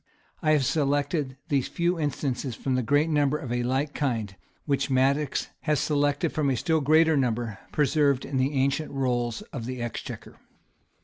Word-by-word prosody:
[] -, -, -36 dB
I 155 Hz, -3 st, +3 dB
have 145 Hz, -3 st, +3 dB
selected 145 Hz, -1 st, 0 dB
these 140 Hz, -3 st, +1 dB
few 175 Hz, 0 st, 0 dB
instances 140 Hz, -4 st, -2 dB
from 130 Hz, +3 st, -1 dB
a 130 Hz, -, +1 dB
great 145 Hz, +6 st, +2 dB
number 150 Hz, -2 st, +2 dB
of 135 Hz, -6 st, -6 dB
a 120 Hz, 0 st, 0 dB
like 135 Hz, +4 st, -1 dB
kind, 115 Hz, -8 st, -2 dB, 0.3 s
which 140 Hz, -1 st, 0 dB
Madox 135 Hz, +2 st, +1 dB
had 150 Hz, -1 st, 0 dB
selected 145 Hz, +3 st, +1 dB
from 150 Hz, -3 st, +1 dB
a 130 Hz, -, +1 dB
still 160 Hz, +1 st, +1 dB
greater 160 Hz, +2 st, +4 dB
number, 120 Hz, -5 st, -1 dB
preserved 145 Hz, -2 st, +2 dB
in 135 Hz, -, -3 dB
the 130 Hz, +3 st, +1 dB
ancient 140 Hz, +3 st, +1 dB
rolls 120 Hz, -4 st, -1 dB
of 120 Hz, -4 st, -5 dB
the 130 Hz, -1 st, -4 dB
exchequer. 120 Hz, -1 st, -6 dB
140 Hz, 175 wpm, -26 LUFS, 130-150 Hz, 0.3 s, greater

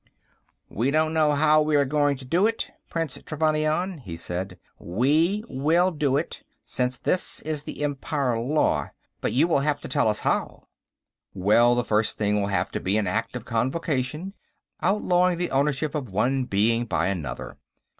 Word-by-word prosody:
"We 120 Hz, +6 st, -1 dB
don't 155 Hz, +2 st, +1 dB
know 155 Hz, -2 st, +3 dB
how 155 Hz, +1 st, +4 dB
we 155 Hz, 0 st, +1 dB
are 140 Hz, -1 st, +4 dB
going 145 Hz, 0 st, +1 dB
to 130 Hz, -, -11 dB
do 175 Hz, +10 st, +3 dB
it, 225 Hz, 0 st, -3 dB, 0.2 s
Prince 165 Hz, -4 st, -3 dB
Trevannion," 155 Hz, +3 st, 0 dB
he 85 Hz, -10 st, -8 dB
said. 90 Hz, +2 st, -5 dB, 0.2 s
"We 155 Hz, -, +1 dB
will 165 Hz, +7 st, +2 dB
do 145 Hz, -4 st, +1 dB
it, 160 Hz, -, -4 dB, 0.2 s
since 125 Hz, 0 st, -1 dB
this 180 Hz, +7 st, -1 dB
is 155 Hz, -1 st, -2 dB
the 150 Hz, -, -6 dB
Empire 140 Hz, -3 st, -1 dB
law, 145 Hz, +6 st, +1 dB, 0.3 s
but -, -, -1 dB
you 140 Hz, +7 st, +3 dB
will 165 Hz, -, +2 dB
have 145 Hz, +1 st, 0 dB
to -, -, -7 dB
tell 140 Hz, -6 st, +1 dB
us 105 Hz, -1 st, 0 dB
how." -, -, -1 dB, 0.7 s
"Well, 110 Hz, +6 st, +4 dB
the 120 Hz, -, +1 dB
first 110 Hz, 0 st, +1 dB
thing 105 Hz, -1 st, +1 dB
will 100 Hz, -, -1 dB
have 100 Hz, -, -1 dB
to -, -, -3 dB
be 95 Hz, +3 st, 0 dB
an 110 Hz, -, +1 dB
Act 115 Hz, +6 st, -2 dB
of 125 Hz, -, -6 dB
Convocation, 135 Hz, +7 st, -2 dB, 0.5 s
outlawing 180 Hz, -3 st, +2 dB
the 175 Hz, 0 st, -2 dB
ownership 140 Hz, +2 st, 0 dB
of 140 Hz, -6 st, -3 dB
one 125 Hz, +7 st, +1 dB
being 115 Hz, +2 st, +1 dB
by 80 Hz, -7 st, 0 dB
another. 80 Hz, -9 st, -4 dB
140 Hz, 175 wpm, -25 LUFS, 115-155 Hz, 0.7 s, how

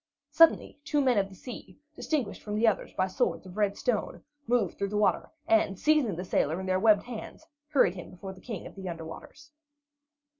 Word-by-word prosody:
Suddenly 330 Hz, -3 st, +4 dB
two 295 Hz, 0 st, 0 dB
men 255 Hz, -6 st, +3 dB
of 195 Hz, 0 st, -1 dB
the 190 Hz, -, -13 dB
sea, 245 Hz, +5 st, -10 dB, 0.2 s
distinguished 270 Hz, -10 st, -2 dB
from 210 Hz, -1 st, -4 dB
the 220 Hz, +2 st, +2 dB
others 215 Hz, -, +1 dB
by 185 Hz, -, +1 dB
swords 190 Hz, -, -1 dB
of 185 Hz, 0 st, -11 dB
red 205 Hz, -1 st, +1 dB
stone, 240 Hz, -4 st, -2 dB, 0.2 s
moved 230 Hz, -6 st, +1 dB
through 200 Hz, -, -2 dB
the 210 Hz, -, -2 dB
water, 210 Hz, -, +2 dB, 0.2 s
and 330 Hz, -, +3 dB
seizing 300 Hz, -, +2 dB
the 180 Hz, +3 st, -5 dB
sailor 160 Hz, -1 st, 0 dB
in 190 Hz, -, -5 dB
their 185 Hz, 0 st, +1 dB
webbed 210 Hz, -1 st, +5 dB
hands, 245 Hz, +5 st, -8 dB, 0.2 s
hurried 270 Hz, -, +4 dB
him 180 Hz, -2 st, -9 dB
before 190 Hz, +2 st, -8 dB
the 185 Hz, -, -16 dB
King 220 Hz, -5 st, -6 dB
of -, -, -9 dB
the 190 Hz, -2 st, -6 dB
Under 165 Hz, -1 st, -6 dB
Waters. 295 Hz, -, -11 dB
205 Hz, 210 wpm, -29 LUFS, 185-250 Hz, 0.2 s, webbed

